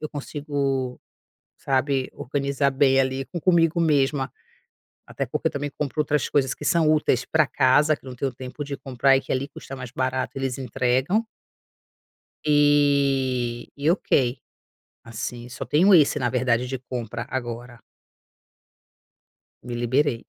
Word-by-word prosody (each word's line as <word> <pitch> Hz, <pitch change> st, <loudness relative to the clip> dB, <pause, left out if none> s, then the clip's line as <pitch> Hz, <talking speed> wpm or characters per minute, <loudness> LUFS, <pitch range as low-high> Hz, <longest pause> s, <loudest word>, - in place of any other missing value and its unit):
eu 155 Hz, -, -4 dB
consigo, 140 Hz, -3 st, -3 dB, 0.6 s
sabe, 135 Hz, 0 st, 0 dB
organizar 140 Hz, +1 st, -1 dB
bem, 135 Hz, 0 st, +3 dB
ali, 135 Hz, 0 st, 0 dB
com 175 Hz, -, -5 dB
comigo 170 Hz, -1 st, +3 dB
mesma, 140 Hz, -4 st, +1 dB, 0.7 s
até -, -, -4 dB
porque -, -, -1 dB
eu -, -, -12 dB
também 145 Hz, 0 st, -3 dB
compro 150 Hz, +1 st, -2 dB
outras 150 Hz, -1 st, +1 dB
coisas 135 Hz, -3 st, +1 dB
que -, -, -10 dB
são 160 Hz, 0 st, +3 dB
úteis 130 Hz, -5 st, +2 dB
para 155 Hz, 0 st, +3 dB
casa, 145 Hz, +4 st, +3 dB
que 135 Hz, -, -20 dB
eu -, -, -6 dB
não 125 Hz, -, -8 dB
tenho 135 Hz, 0 st, -2 dB
tempo 130 Hz, +4 st, -7 dB
de 140 Hz, -1 st, -5 dB
comprar 135 Hz, +1 st, +2 dB
e -, -, +1 dB
que -, -, -14 dB
ali 135 Hz, +2 st, -1 dB
custa 135 Hz, -, -9 dB
mais 125 Hz, -2 st, -7 dB
barato, 130 Hz, +1 st, -2 dB
eles 135 Hz, -2 st, -2 dB
entregam. 130 Hz, -, 0 dB, 1.2 s
E 140 Hz, -5 st, +2 dB
e 145 Hz, +3 st, +2 dB
ok, 130 Hz, -8 st, +1 dB, 0.6 s
assim, 120 Hz, +1 st, -6 dB
só -, -, -6 dB
tenho 185 Hz, +6 st, +5 dB
esse 150 Hz, -3 st, +5 dB
na 120 Hz, -3 st, 0 dB
verdade, 125 Hz, -1 st, +1 dB
de 130 Hz, 0 st, -4 dB
compra 120 Hz, -3 st, -5 dB
agora. 120 Hz, -1 st, -5 dB, 1.8 s
Me 120 Hz, 0 st, -5 dB
liberei. 120 Hz, +1 st, 0 dB
135 Hz, 150 wpm, -24 LUFS, 125-145 Hz, 1.8 s, tenho